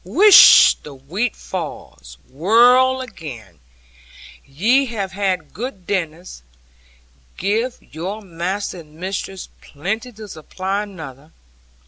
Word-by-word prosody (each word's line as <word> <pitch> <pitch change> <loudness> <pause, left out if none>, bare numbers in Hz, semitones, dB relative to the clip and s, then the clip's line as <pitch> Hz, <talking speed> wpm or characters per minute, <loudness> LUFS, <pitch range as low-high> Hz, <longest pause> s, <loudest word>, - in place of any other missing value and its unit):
Whish, 365 - +7
the 145 -2 -11
wheat 180 - -3
falls! 65 - -8
Whirl 245 - +4
again; 120 - -10 0.8
ye 225 - +1
have 200 -5 -4
had 190 -5 -2
good 210 -5 -7
dinners; 175 - -4 1.0
give 225 +6 -1
your 190 +8 -7
master 185 +2 -4
and 155 -2 -16
mistress 190 +2 -6
plenty 220 - -5
to 215 0 -11
supply 190 +3 -4
another 160 -10 -9
year. 160 - -26
190 Hz, 105 wpm, -19 LUFS, 160-220 Hz, 1.0 s, Whish